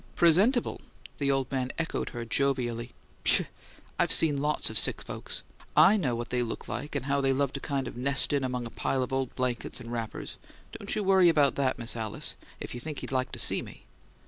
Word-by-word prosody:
"'Presentable?'" 195 - +3 0.4
The 140 -1 +1
old 135 -2 0
man 130 -1 -1
echoed 165 0 -2
her 120 -1 -6
jovially. 120 -2 0 0.3
"Pshaw! - - +4 0.6
I've - - +2
seen 145 -4 +5
lots 150 -5 +1
of 110 - +5
sick - - +1
folks. - - -5 0.3
I 210 - +7
know 135 - 0
what 120 0 -5
they 125 0 +1
look 115 -2 -4
like 145 +6 -5
and 135 -2 -2
how 140 0 +1
they 135 0 +2
love 140 0 0
to 140 - -4
kind 135 -3 -3
of - - -7
nest 140 +4 +3
in 140 -2 +1
among 125 -1 -2
a 115 - -8
pile 130 -1 -1
of 125 - -5
old 135 -1 -2
blankets 125 -2 -2
and 115 - -9
wrappers. 115 -2 -5 0.3
Don't - - -5
you 210 - -1
worry 190 -2 +5
about 145 -4 +3
THAT, 135 -2 0
Miss 120 -1 -2
Alice, 110 -3 -3 0.2
if - - -6
you 120 - -6
think 150 +3 -6
he'd - - -6
like 130 -1 -1
to - - -5
see - - +5
me." - - -12
135 Hz, 220 wpm, -28 LUFS, 120-145 Hz, 0.6 s, I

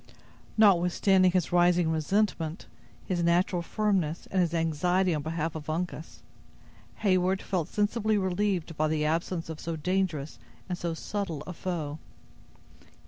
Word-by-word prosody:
Notwithstanding 185 -1 +5
his 180 -2 0
rising 175 -1 +4
resentment, 165 0 0 0.4
his 180 -2 -1
natural 175 +1 +2
firmness, 185 -4 -1
and 190 - +2
his 170 -3 +1
anxiety 170 +3 +1
on 150 - -1
behalf 160 +1 -2
of 155 -1 -7
Uncas, 165 0 -4 0.8
Heyward 185 -1 +3
felt 180 -6 -2
sensibly 215 +1 +1
relieved 190 -3 -1
by 155 +1 +1
the 155 -1 0
absence 165 +2 -1
of 160 -1 -6
so 165 -1 -4
dangerous 170 -3 -1 0.3
and 180 - -2
so 170 -1 -3
subtle 170 -5 -4
a 180 - -6
foe. 160 -4 -4
175 Hz, 135 wpm, -28 LUFS, 160-190 Hz, 0.8 s, Notwithstanding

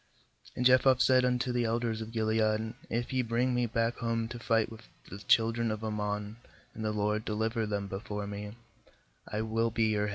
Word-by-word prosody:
9And 125 - 0
Jephthah 130 0 +6
said 130 -1 +5
unto 125 0 +1
the 120 0 +1
elders 115 -1 -1
of 110 0 -6
Gilead: 110 0 +1 0.2
'If 120 +3 -2
ye 130 - +2
bring 120 +2 0
me 125 -1 +1
back 115 +1 0
home 115 -1 -1
to 120 - -7
fight 115 -1 +1
with 110 - -10 0.3
the 100 - -7
children 115 +2 +2
of 110 0 -3
Ammon, 105 0 -3 0.4
and 110 - -6
the 110 - 0
LORD 105 +1 0
deliver 110 +1 -1
them 100 -1 -2
before 105 +1 -5
me, 105 +2 -6 0.7
I 105 +1 -2
will 115 +1 0
be 115 -1 +1
your 105 -1 +1
head.' - - -2
110 Hz, 195 wpm, -30 LUFS, 105-120 Hz, 0.7 s, Jephthah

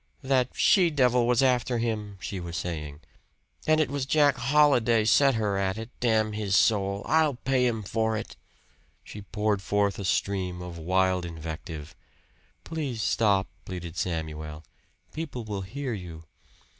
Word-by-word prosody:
"That 130 -2 +2
she 180 -4 +4
devil 125 -5 +3
was 125 +2 +3
after 125 -2 +2
him!" 105 -3 -3
she 95 +2 -5
was 85 -1 -5
saying. 75 -2 -5 0.7
"And 155 0 +4
it 150 -4 +1
was 140 -2 -2
Jack 145 -2 +4
Holliday 125 -4 +3
set 135 +4 +4
her 105 -3 0
at 95 +1 -1
it, 115 +2 -7
damn 110 -3 +2
his 105 -2 -1
soul! 100 -2 +2
I'll 155 -3 +3
pay 125 0 +1
him 115 -3 -2
for 110 +2 0
it!" - - -7 0.7
She 105 - -9
poured 105 0 -1
forth 100 +1 0
a 100 - -4
stream 95 -1 -1
of 90 -1 -7
wild 95 +2 +1
invective. 80 -2 -7 0.7
"Please 140 -9 -3
stop," 100 -3 +2 0.2
pleaded 90 -2 -7
Samuel. 80 -3 -4 0.5
"People 155 -7 -5
will 105 -3 -4
hear 130 +6 -4
you." 85 -5 -8
105 Hz, 150 wpm, -27 LUFS, 90-125 Hz, 0.7 s, she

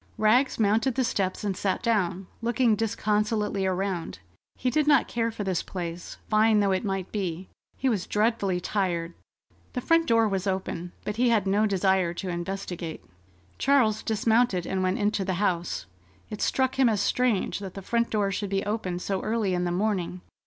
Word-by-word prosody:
Rags 245 +5 +3
mounted 225 +4 +2
the 260 - +2
steps 195 -5 -1
and 200 -2 -1
sat 190 +3 -1
down, 195 -5 0 0.2
looking 235 -1 +2
disconsolately 210 -2 0
around. 185 - -2 0.4
He 250 - -1
did 305 +1 +1
not 285 -4 +5
care 230 -1 -1
for 220 -2 -5
this 190 -3 0
place, 175 -2 -6
fine 215 0 +4
though 200 -1 +2
it 190 +3 0
might 195 -3 -3
be. 185 -3 -3 0.3
He 265 - 0
was 215 -7 0
dreadfully 210 -4 +1
tired. 175 -3 -1 0.6
The 250 - -1
front 330 +4 +3
door 230 -3 +4
was 195 -1 -2
open, 185 -2 -3
but 210 +1 -3
he 245 0 +3
had 220 -4 +2
no 205 +3 +2
desire 190 -3 +1
to 185 +1 -4
investigate. 175 -1 -5 0.5
Charles 250 -6 +3
dismounted 220 -4 +2
and 190 +1 -1
went 185 +1 +1
into 205 -1 0
the 185 -1 -1
house. 175 - -1 0.5
It 210 - -5
struck 265 0 +1
him 260 -3 +6
as 215 -2 +1
strange 235 -1 +1
that 195 -3 -7
the 195 - -7
front 235 +3 0
door 205 -2 0
should 205 0 -3
be 195 0 -1
open 205 -4 -2
so 190 +1 -2
early 215 -4 0
in 180 0 0
the 175 - -1
morning. 185 -2 -1
205 Hz, 180 wpm, -27 LUFS, 185-225 Hz, 0.6 s, him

